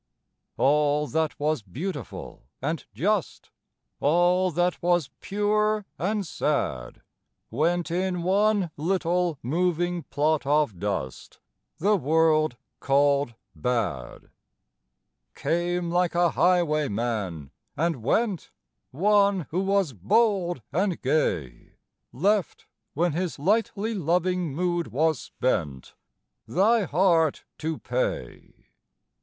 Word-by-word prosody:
_) - - -55 0.5
All 150 +1 +3
that 160 +1 -1
was 150 -2 0
beautiful 135 - -7
and 155 +3 -3
just, 180 - -1 0.5
All 175 +4 +3
that 175 +1 0
was 175 -5 +1
pure 210 +1 0
and 205 +2 -1
sad 65 - -2 0.5
Went 170 +7 0
in 180 0 -1
one 200 -1 +2
little, 175 0 0
moving 175 +5 0
plot 150 +1 0
of 145 - +1
dust 95 -10 -4 0.4
The 205 +5 +3
world 155 -4 +2 0.2
called 140 -2 +2 0.2
bad. 105 - -3 1.0
Came 175 0 -1
like 175 0 +1
a 175 -1 +3
highwayman, 120 - 0 0.3
and 165 -6 0
went, 195 - 0 0.4
One 200 +4 +3
who 175 - 0
was 195 -6 +1
bold 175 - +1
and 185 +2 0
gay, 85 - -1 0.4
Left 195 - 0 0.3
when 170 +3 +2
his 175 +1 -2
lightly 215 +6 0
loving 180 -2 0
mood 175 0 0
was 155 +3 +1
spent 75 - -2 0.5
Thy 210 +4 +3
heart 165 -2 +2 0.2
to 160 0 -2
pay. 125 - -4
165 Hz, 100 wpm, -26 LUFS, 140-185 Hz, 1.0 s, All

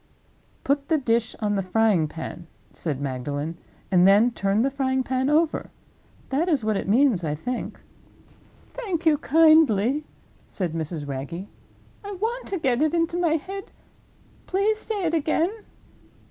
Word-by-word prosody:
"Put 280 +1 0
the 320 - +4
dish 230 -4 0
on 210 -1 0
the 200 - +1
frying 190 -3 +2
pan," 160 +2 -8 0.3
said 140 - -3
Magdalen; 145 +4 -4 0.3
"and 180 0 +5
then 210 +5 +5
turn 200 0 +1
the 275 - +1
frying 265 -1 0
pan 260 +1 0
over. 315 +1 +1 0.6
That 310 +7 0
is 280 -9 +1
what 215 -1 +1
it - - -3
means, 235 -5 +3
I 150 -2 -1
think." 245 +11 -5 0.9
"Thank 385 -10 -4
you 305 -3 +4
kindly," 305 -5 +4 0.4
said 180 -5 -3
Mrs. 160 -2 -4
Wragge, 140 +7 -5 0.6
"I 405 0 -6
want 455 +6 -3
to 390 - -2
get 260 -5 0
it 310 +2 +2
into 335 0 0
my 345 -3 +2
head; 385 +5 -6 0.8
please 415 +3 +1
say 415 -5 -2
it 325 - 0
again." 325 +3 +1
260 Hz, 150 wpm, -24 LUFS, -, 0.9 s, and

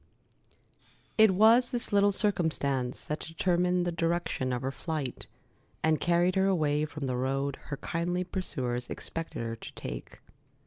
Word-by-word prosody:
It 220 -1 +7
was 225 +6 +5
this 240 -4 -3
little 205 0 +5
circumstance 155 - 0
that 150 - -3
determined 180 +2 +1
the 175 - 0
direction 165 -6 -1
of 125 0 -2
her 135 - -1
flight, 150 -3 -4 0.6
and 160 -1 +2
carried 175 +1 +3
her 190 0 +3
away 155 -5 +2
from 150 -1 -6
the 130 -1 -1
road 135 +2 -1
her 140 - -4
kindly 175 +4 -1
pursuers 125 -10 -3
expected 165 -7 -5
her 115 0 -3
to 115 - -10
take. - - -7
165 Hz, 145 wpm, -29 LUFS, 135-180 Hz, 0.6 s, It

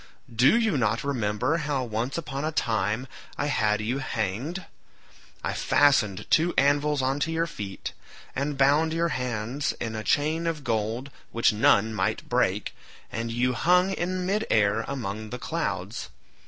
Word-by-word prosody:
Do 130 - +5
you 220 - +2
not 115 0 +1
remember 125 +2 0
how 145 -4 -1
once 120 +4 -2
upon 145 -4 -4
a 155 - 0
time 110 -3 0 0.3
I 145 - 0
had 110 -7 +1
you 120 +5 -1
hanged? 130 - -3 0.8
I - - -1
fastened 115 -10 +3
two 170 +2 +3
anvils 145 0 +3
on 135 +2 0
to 165 +3 0
your 165 +1 +1
feet, 105 -12 -6 0.4
and 140 +1 -2
bound 145 +4 +4
your 170 +1 +1
hands 125 0 -2
in 110 -1 -3
a 110 - -4
chain 155 +7 +1
of 160 -3 -2
gold 115 +2 -2 0.2
which 115 -1 +3
none 110 0 +4
might 95 -3 -1
break, - - 0 0.4
and 115 +1 -3
you 125 +2 +1
hung 180 +8 +3
in 185 0 -2
mid 210 +4 0
air 105 +1 +3
among 110 -5 -4
the 125 - -5
clouds. - - -3
135 Hz, 155 wpm, -26 LUFS, 110-155 Hz, 0.8 s, Do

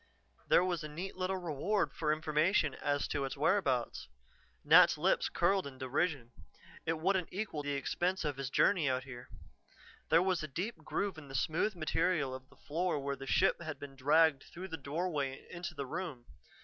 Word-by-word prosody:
There - - +5
was 175 -3 -1
a - - -4
neat 170 +6 -6
little 185 +1 -1
reward 180 +4 -1
for 155 -2 0
information 155 +1 +2
as 145 +1 -1
to 140 - -1
its 135 +1 -4
whereabouts. 140 - +1 0.6
Nat's - - +7
lips - - +2
curled 190 0 +2
in 135 -2 -10
derision: 130 -1 -1 0.6
it 165 0 +1
wouldn't 190 +1 +1
equal 195 -6 -3
the 145 0 -2
expense 175 +6 -1
of 145 -3 -2
his 135 -2 -3
journey 160 0 +3
out 130 0 0
here. 125 -2 -10 0.8
There 165 +2 +5
was 185 -2 +1
a 155 - -4
deep 180 - -4
groove 175 +3 -3
in 145 - -12
the 135 - -8
smooth 175 +9 0
material 155 -3 0
of 130 0 -9
the - - -20
floor 170 +2 -1
where 140 0 -2
the 135 0 -9
ship 190 +3 +3
had 155 -2 -5
been 140 -1 -9
dragged 145 +2 +4
through 185 +2 -9
the 160 - -4
doorway 145 -2 -3
into 170 -1 -6
the 140 -2 -4
room. 150 -5 -5
155 Hz, 185 wpm, -33 LUFS, 140-180 Hz, 0.8 s, Nat's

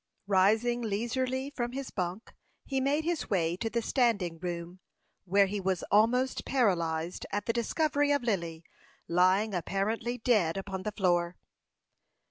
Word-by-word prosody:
Rising 215 +5 +3
leisurely 255 +5 -2
from 240 -3 -3
his 275 0 -5
bunk, 185 +3 -4 0.3
he 270 -1 -1
made 285 +4 +1
his 340 -1 -2
way 170 -4 +1
to 225 - -2
the 235 0 -1
standing 205 -12 +1
room 175 0 -5 0.5
where 200 +2 +4
he 200 +1 -3
was 185 -1 -1
almost 245 +5 +3
paralyzed 170 -9 0
at 205 -1 -2
the 230 - 0
discovery 290 +4 +1
of 285 -3 +1
Lily 170 -8 -2 0.4
lying 185 +5 +3
apparently 210 +7 -1
dead 210 -9 +2
upon 195 -1 -4
the 210 - -3
floor. 175 -3 +1
205 Hz, 140 wpm, -30 LUFS, 180-245 Hz, 0.5 s, where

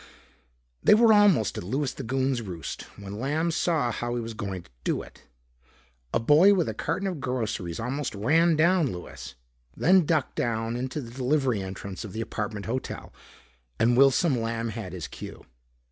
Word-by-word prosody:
They - - +6
were 225 0 +6
almost 200 - +4
at - - -6
Louis 130 +8 -1
the - - -7
Goon's 130 0 0
roost 90 -6 -6
when 100 +1 -7
Lamb 155 +6 0
saw 160 -6 +1
how 120 +2 -3
he - - -1
was 115 0 -5
going 95 -5 -5
to 85 - -23
do - - -1
it. - - -16 0.9
A - - +2
boy 155 - +6
with 175 -4 +1
a - - -2
carton 195 - -2
of 175 -7 -4
groceries 110 -9 -3
almost 125 +2 -3
ran 160 +11 +3
down 165 -3 +3
Louis, 90 - -8 0.4
then 180 -2 +4
ducked 155 -5 0
down 115 0 -1
into 130 +4 -3
the 115 -3 -9
delivery 130 -3 0
entrance 95 +1 -6
of 105 -4 -8
the 110 - -3
apartment 105 -2 -4
hotel. 125 +5 -4 0.6
And 120 - +3
Wilson 135 0 +4
Lamb 115 0 -2
had 110 -4 -6
his 90 -3 -5
cue. - - -10
125 Hz, 175 wpm, -27 LUFS, 110-150 Hz, 0.9 s, They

